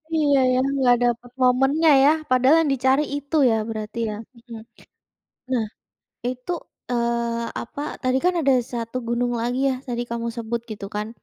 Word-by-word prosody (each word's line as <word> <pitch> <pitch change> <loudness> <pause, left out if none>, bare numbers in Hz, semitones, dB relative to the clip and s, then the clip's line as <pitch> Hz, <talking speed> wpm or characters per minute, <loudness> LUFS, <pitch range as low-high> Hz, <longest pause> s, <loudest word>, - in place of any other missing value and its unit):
Iya 290 -3 +3 0.2
ya, - - +2 0.2
nggak 245 -2 +4
dapet 240 0 -1
momennya 270 +6 +3
ya, 285 - +7 0.2
padahal 255 +4 +5
yang 295 -4 0
dicari 265 +3 +2
itu 285 +2 -4
ya 225 - +2
berarti 215 0 -6
ya. 210 - -4 0.2
Mhm. 230 -1 -11 0.9
Nah, 235 -4 +1 0.6
itu, 255 +6 -4 0.4
eee, 235 -1 -1 0.2
apa, 260 +5 -7 0.2
tadi 255 +1 +2
kan 365 - +3
ada 275 -2 +3 0.2
1 230 +1 -3
gunung 240 +1 0
lagi 245 +2 -1
ya, - - +1
tadi 240 -1 -2
kamu 235 0 -3
sebut 230 0 -3
gitu 200 -2 -6
kan. 210 +1 -2
245 Hz, 160 wpm, -23 LUFS, 235-270 Hz, 0.9 s, ya